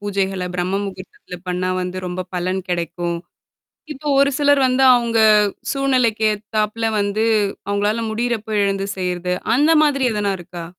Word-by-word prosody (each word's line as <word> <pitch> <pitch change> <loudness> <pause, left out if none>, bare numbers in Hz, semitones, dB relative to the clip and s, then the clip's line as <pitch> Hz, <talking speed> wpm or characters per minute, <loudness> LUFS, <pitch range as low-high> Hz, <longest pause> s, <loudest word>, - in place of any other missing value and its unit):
பூஜைகள 195 -2 -2
பிரம்ம 185 +2 -1
முகூர்த்தத்தில 185 -2 -9
பண்ணா 180 +1 -1
வந்து, 180 0 -4
ரொம்ப 180 +1 -4
பலன் 185 +2 -1
கெடைக்கும். 170 0 -2 0.8
இப்ப 295 +2 -5
ஒரு 280 0 +4
சிலர் 285 -1 +4
வந்து, 255 +1 +2
அவுங்க 235 -1 0 0.5
சூழ்நிலைக்கு 255 -5 +1
ஏத்தாப்ல 215 +1 -2
வந்து, 205 +2 0 0.4
அவுங்களால 205 +3 0
முடியிறப்ப 220 -2 -2
எழந்து 195 0 -1
செய்றது, 180 -1 -2 0.2
அந்த 300 +5 +4
மாதிரி 275 -3 +1
எதனா 205 -1 0
இருக்கா? 175 -1 -8
205 Hz, 135 wpm, -20 LUFS, 180-235 Hz, 0.8 s, ஒரு